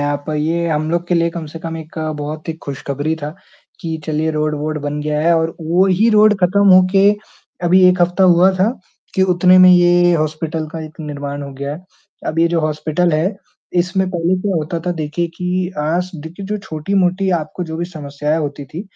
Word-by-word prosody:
हैं 145 - 0
आप। 145 0 -2
ये 165 +3 0
हम 155 0 -1
लोग 170 +1 -1
के 180 - +2
लिए 170 0 +2
कम 165 -1 -6
से 155 +2 -9
कम 165 0 -5
एक 160 0 -9 0.2
बहुत 155 +2 -6
ही - - 0
खुशखबरी 140 +2 -3
था 150 +2 -5 0.5
कि 165 -1 -3
चलिए 155 0 0
रोड, 155 0 -1
वोड 155 +1 -3
बन 145 0 -3
गया 150 0 -1
है 170 +2 +3
और 165 0 -1
वही 185 +6 +2
रोड 215 0 +5
ख़त्म 200 +3 +3
होके 190 +2 +5 0.5
अभी 185 +2 +5
1 180 0 +2
हफ्ता 180 +2 +2
हुआ 180 +1 +5
था 190 +4 +2 0.4
कि 190 - +2
उतने 180 +1 +5
में 185 0 +8
ये 175 0 +5
हॉस्पिटल 155 0 -2
का 165 - -5
एक 155 +1 -11
निर्माण 145 -1 -5
हो 140 0 -7
गया 140 +2 -4
है। 180 +4 -12 0.4
अब 155 - -2
ये 165 - +5
जो 170 -1 0
हॉस्पिटल 155 +3 0
है, 165 +7 0 0.4
इसमें 185 +2 +1
पहले 175 0 0
क्या 200 -2 -1
होता 160 +2 -2
था 180 - +1
देखिए 160 +1 -2
कि 180 0 -2
आज 170 +5 -1
देखिए 165 +5 -8
जो 210 +2 -2
छोटी-मोटी 185 +2 0
आपको 160 +3 -6
जो 160 -1 -6
भी 170 - -2
समस्याएँ 150 -2 -3
होती 145 -2 -4
थीं 155 +7 -7
165 Hz, 205 wpm, -17 LUFS, 155-180 Hz, 0.5 s, में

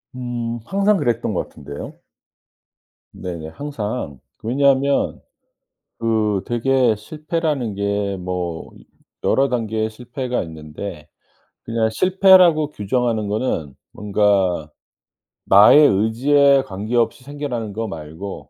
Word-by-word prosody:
음. 120 -2 -4
항상 200 +1 +2
그랬던 120 - -1
것 - - -3
같은데요. 70 0 -9 1.2
네네. 85 -3 -6
항상 110 - -5 0.2
그 - - -10
왜냐하면 140 +2 +2 0.8
그 110 -3 +1
되게 120 -1 +2
실패라는 150 - -3
게 100 0 -1
뭐 90 -2 -4 0.5
여러 135 +1 +3
단계의 110 -3 -1
실패가 125 +2 -4
있는데 80 +1 -8 0.6
그냥 115 -1 0
실패라고 180 - +5
규정하는 110 0 -1
거는 100 - -2 0.2
뭔가 100 -6 +1 0.8
나의 105 +9 +7
의지에 135 +7 +3
관계없이 115 +5 -1
생겨나는 130 -6 -5
거 115 +2 -3
말고 80 +3 -8
115 Hz, 225 characters per minute, -20 LUFS, 100-135 Hz, 1.2 s, 나의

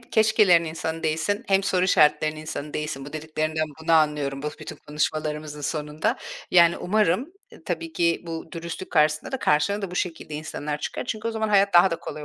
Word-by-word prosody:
keşkelerin 215 -7 +4
insanı 160 0 -4
değilsin 160 +6 -1
hem 195 0 +3
soru 185 -2 +1
işaretlerinin 155 -3 +3
insanı 150 -1 -6
değilsin. 150 -3 -3
Bu 145 - -10
dediklerinden 155 0 -2 0.2
bunu 165 +1 +1
anlıyorum, 150 -3 +2
bu 150 - -2
bütün - - -8
konuşmalarımızın 150 0 -3
sonunda. 150 +1 -2 0.3
Yani, 170 -1 +5
umarım, 215 - +1 0.2
e, - - -16
tabii 330 -1 -4
ki 170 - +1
bu 165 -1 -6
dürüstlük 170 +2 -6
karşısında 155 - +2
da 265 - -1
karşına 200 +4 +1
da 195 - -3
bu - - -7
şekilde 165 -4 -3
insanlar 150 -1 -4
çıkar - - -4
çünkü 225 -2 -3
o - - -1
zaman 220 -1 -2
hayat 200 -2 +3
daha 175 +2 +7
da 165 - -1
kolay 150 -1 -7
160 Hz, 185 wpm, -24 LUFS, 150-190 Hz, 0.3 s, daha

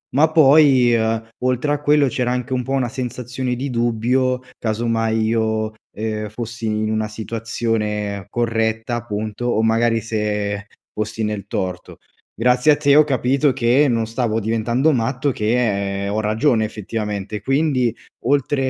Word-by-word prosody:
ma 155 +3 +4
poi, 140 -5 +6
uhm, 115 0 -1
oltre 130 +3 +1
a 145 - -2
quello 145 -1 +4
c'era 125 0 -1
anche 125 0 -2
un 125 -1 0
po' 135 - -6
una 130 -3 0
sensazione 125 0 -4
di 135 +3 -4
dubbio 120 +2 +1 0.2
casomai 115 0 0
io, 110 -1 0 0.2
uhm, 110 -1 -4
fossi 115 +1 -6
in 110 0 -1
una 110 0 -1
situazione 105 -2 -3
corretta, 115 0 -1
appunto, 110 -1 -4
o 115 -2 +1
magari 115 0 +2
se 105 -2 -2 0.3
fossi 110 +1 -3
nel 105 -2 -3
torto. 90 -1 -4 0.4
Grazie 125 +4 +4
a 145 - +3
te 145 -1 +3
ho 150 - +8
capito 135 +1 +1
che 130 +3 +3
non 115 -2 0
stavo 115 -1 -1
diventando 115 +7 +1
matto, 130 +3 0
che 105 -4 0
ho 105 +2 -1
ragione 110 +2 +2
effettivamente. 105 -1 -4
Quindi 135 -1 +1 0.3
oltre 135 0 +1
115 Hz, 145 wpm, -20 LUFS, 110-130 Hz, 0.4 s, ho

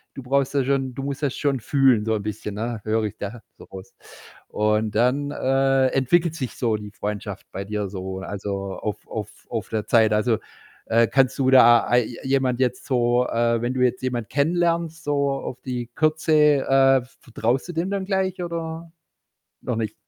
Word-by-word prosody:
du 135 - -8
brauchst 140 +2 0
ja 140 - +3
schon 135 -1 -1
du 135 - -5
musst 140 +1 -4
das 140 -3 -1
schon 140 -3 0
fühlen 130 -2 +3
so 110 0 0
'n 105 - -3
bisschen, 105 -1 -5
ne, 115 0 -4
höre 110 0 0
ich 105 - -4
da 110 +3 -6 0.2
so - - -12
raus 95 0 -11 0.5
und 105 0 0
dann, 125 +5 +2
äh, 135 -1 +2
entwickelt 160 +6 +2
sich 130 -7 -5
so 115 -3 0
die 105 -1 -9
Freundschaft 105 -1 -5
bei 95 - -5
dir 105 0 -3
so, 95 0 -6
also, 100 0 -4
auf 105 -2 -5
auf - - -5 0.2
auf - - -3
der 110 -2 -2
Zeit. 110 -2 +4
Also, 110 +1 +1 0.5
äh, 115 +1 +4
kannst 130 0 +2
du 130 -1 +2
da 120 -2 +7
ei 120 -1 +3
je 120 - -8
jemand 130 -2 +1
jetzt 125 -1 -1
so 125 -1 +2
äh, 115 0 +1
wenn 120 +2 -2
du 130 - -1
jetzt 125 0 +1
jemand 120 -3 -3
kennenlernst 170 +3 0
so 140 -1 +1
auf 135 -2 -5
die 125 -2 -5
Kürze, 155 +2 +1 0.3
äh, 135 -1 +4
v 125 - -21
vertraust 120 +2 -1
du 175 - -6
dem 170 +4 -2
dann 195 -1 -2
gleich 190 -2 -1
oder 165 -1 -5 0.7
noch 125 - -3
nicht? 110 -1 -2
125 Hz, 195 wpm, -23 LUFS, 110-140 Hz, 0.7 s, da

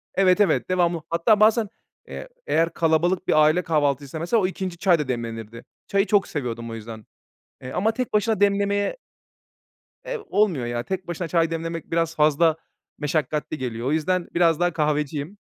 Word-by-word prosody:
Evet, 190 +1 +4
evet, 200 - +2
devamlı. 175 -2 +1
Hatta 170 +6 +3
bazen, 220 0 +4 0.4
eee, - - -8 0.2
eğer 165 +1 +1
kalabalık 170 +3 +1
bir 155 - +5
aile 155 +4 +3
kahvaltıysa, 145 -2 -1
mesela, 185 +7 +1
o 185 - +2
2'nci 185 -2 -5
çay 175 -3 +3
da 150 - -2
demlenirdi. 115 -2 -5 0.2
Çayı 200 +1 +2
çok 205 -2 +2
seviyordum 120 -5 -4
o 115 - -6
yüzden. 110 -1 -9 0.6
Eee, 130 - -7
ama 215 +9 +1
tek 255 -1 -3
başına 215 0 +1
demlemeye 200 - +1 1.1
eee, - - -3
olmuyor 185 - +1
ya. 120 0 -2
Tek 190 +5 -4
başına 175 0 -4
çay 165 -1 +1
demlemek 165 0 -5
biraz 165 0 0
fazla 155 +1 +3 0.4
meşakkatli 150 0 -2
geliyor. 120 -2 -4
O 140 - +1
yüzden 175 +3 0
biraz 170 -1 +3
daha 175 0 +2
kahveciyim. 150 +3 -2
165 Hz, 165 wpm, -23 LUFS, 150-190 Hz, 1.1 s, bir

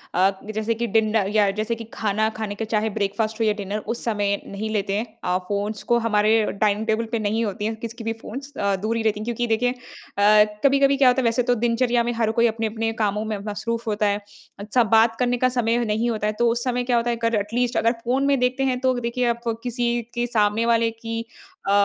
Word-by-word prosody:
अ, 190 +2 +4 0.2
जैसे 220 +1 0
कि 235 +1 -2
डिन 215 0 +2
अ, 220 -3 +3
या 205 0 +3
जैसे 225 +2 -1
कि 230 - -8
खाना 215 0 0
खाने 215 -2 -4
के 225 - -3
चाहे 220 0 0
ब्रेकफ़ास्ट 215 +2 -2
हो 225 - +2
या 215 - +3
डिनर 205 0 -4 0.2
उस 235 - -8
समय 205 -3 +1
नहीं 210 +2 -5
लेते 200 -2 -1
हैं। 220 - -1 0.2
अ, 180 0 +1
फ़ोन्स 205 +1 -3
को 240 - +6
हमारे 215 0 +3
डाइनिंग 210 +1 0
टेबल 220 +1 +1
पे 230 - 0
नहीं 215 +2 0
होती 205 0 -3
है 220 +1 -1
किसी 230 +1 -7
की 230 - -7
भी 225 0 -1
फ़ोन्स 275 +5 -7
अ, 200 -1 +1
दूर 215 +4 -2
ही 225 - -2
रहती 215 -1 +1
हैं। 215 - -5
क्योंकि 240 0 -2
देखिए 230 +2 +1
अ, 210 -4 +2 0.2
कभी-कभी 275 0 +4
क्या 270 -1 +5
होता 250 +1 +2
है - - -3
वैसे 230 +2 +2
तो 245 0 +2
दिनचर्या 240 0 +2
में 240 - -1
हर 225 -1 0
कोई 235 +1 +3
अपने-अपने 225 0 -2
कामों 210 +1 0
में 215 -1 -2
मसरूफ़ 230 +3 -3
होता 210 -1 0
है। 205 0 0 0.4
अच्छा, 210 +4 +2
बात 225 +1 +4
करने 245 -1 +1
का 255 +1 +2
समय 230 0 +2
नहीं 220 +2 0
होता 215 -2 -1
है 215 - 0
तो 240 - +4
उस 235 +1 -2
समय 250 -1 0
क्या 245 -1 +1
होता 235 +1 0
है 235 - +1
अगर 230 0 0
एटलीस्ट 235 +4 -1
अगर 230 - +3
फ़ोन 260 +3 +1
में 280 -2 +3
देखते 250 +2 +1
हैं। 255 -2 0
तो 260 0 +2
देखिए 245 +1 -1
आप 235 0 -2 0.2
किसी 240 -1 -1
के 240 0 0
सामने 220 -1 +1
वाले 230 -1 +2
की 230 0 -5 0.5
अ, - - +3
225 Hz, 245 wpm, -23 LUFS, 210-240 Hz, 0.5 s, को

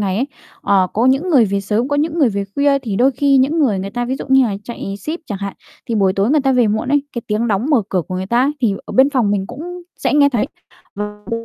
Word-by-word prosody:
ngày 195 -2 -1
ấy, 260 +5 0 0.4
ờ, 195 -2 +3
có 230 +4 +1
những 270 +8 +2
người 260 -8 +5
về 200 0 -1
sớm, 215 +6 -1
có 285 - 0
những 310 +3 -1
người 280 -7 +4
về 200 -1 -2
khuya. 280 -1 +3
Thì 220 -7 -4
đôi 255 +5 +4
khi 280 +1 +2
những 285 +6 +2
người, 235 -11 +2
người 195 +1 -4
ta 245 +3 -2
ví 260 +2 -2
dụ - - -6
như 265 0 +5
là 200 -3 -3
chạy 200 -4 -6
ship 310 - -5
chẳng 200 -3 -4
hạn, 200 -1 -5 0.3
thì 230 - -2
buổi 195 -3 +2
tối 195 +4 +1
người 300 +1 +4
ta 270 -1 +1
về 245 -3 +3
muộn 220 +4 -1
ấy, 290 0 +2
cái 235 - -5
tiếng 220 +2 -1
đóng, 210 +5 0
mở 245 -7 +4
cửa 185 -2 0
của 185 - -4
người 185 +1 -3
ta 235 +4 +2
ấy, 280 - +1
thì 220 -5 +2
ở - - -7
bên 270 +2 +4
phòng 245 -7 +1
mình 195 -2 -1
cũng 350 - -8
sẽ - - -1
nghe 285 -1 +5
thấy, 245 -3 0 0.5
ờ, 210 0 -6
ừm, 230 0 -4
235 Hz, 295 wpm, -18 LUFS, 200-275 Hz, 0.5 s, người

